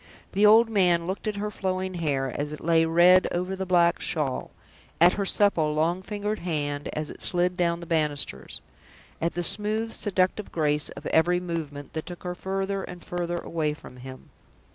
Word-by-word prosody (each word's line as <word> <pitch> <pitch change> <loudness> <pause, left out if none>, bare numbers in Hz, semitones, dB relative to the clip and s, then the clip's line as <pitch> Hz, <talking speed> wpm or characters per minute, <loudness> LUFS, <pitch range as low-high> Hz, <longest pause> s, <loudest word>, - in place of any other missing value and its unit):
The 205 +2 +4
old 225 +2 +7
man 180 -6 +2
looked 190 +5 -4
at 210 - -1
her 210 +1 -3
flowing 185 -1 -2
hair, 140 -6 -1
as 145 +1 -3
it 150 - -8
lay 165 -1 +4
red 175 +3 +5
over 180 +2 -2
the 190 0 -4
black 175 -1 +3
shawl 150 -8 -2 0.5
at 175 +3 +6
her 200 - -2
supple, 165 -8 +2
long 170 +4 +1
fingered 210 +2 -3
hand, 145 -4 -2
as 155 0 -4
it - - -12
slid 180 0 +1
down 170 -1 0
the - - -7
banisters 150 - -2 0.6
at 170 +1 -1
the 175 - -1
smooth, 215 +4 0
seductive 190 0 -1
grace 150 -2 0
of - - -10
every 175 +2 +3
movement 155 -5 -5
that 160 - -5
took 175 -1 -9
her 180 -1 -3
further 195 +2 -3
and 180 -2 -9
further 175 -1 -3
away 155 -3 -2
from 125 - -13
him. 130 +1 -11
175 Hz, 185 wpm, -26 LUFS, 155-190 Hz, 0.6 s, old